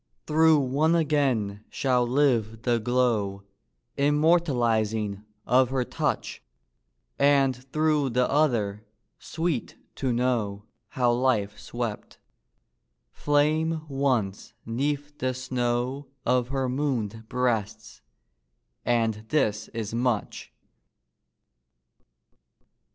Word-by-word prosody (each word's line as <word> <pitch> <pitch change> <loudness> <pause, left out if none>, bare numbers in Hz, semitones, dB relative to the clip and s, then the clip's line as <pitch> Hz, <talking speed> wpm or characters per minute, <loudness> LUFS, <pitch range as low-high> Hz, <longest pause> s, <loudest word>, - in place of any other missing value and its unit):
Through 160 0 +5
one 145 +5 +2
again 135 -11 0
shall 125 -2 +1
live 120 -5 +1
the 120 -2 +2
glow, 110 -5 0 0.5
Immortalizing, 120 - +1 0.2
of 125 +1 +4
her 130 -1 0
touch; - - -3 0.8
And 140 -2 +4 0.2
through 155 -3 +2
the 125 +1 +1
other, 115 -9 +1 0.4
sweet 160 -6 -3 0.2
to 130 -2 0
know 115 -5 0 0.2
How 125 -2 +1
life 120 -5 0
swept, 120 -3 -5 0.9
flame 155 +2 +1
once, 130 -8 -1
'neath 145 +5 -3
the 130 0 -1
snow 130 +1 -2 0.2
Of 125 0 +2
her 135 0 -1
moon'd 120 -5 -2
breasts 120 -5 -2 0.8
and 115 -3 0
this 110 -8 0
is 110 -2 -5
much! 120 -2 -2
125 Hz, 90 wpm, -26 LUFS, 115-145 Hz, 0.9 s, Through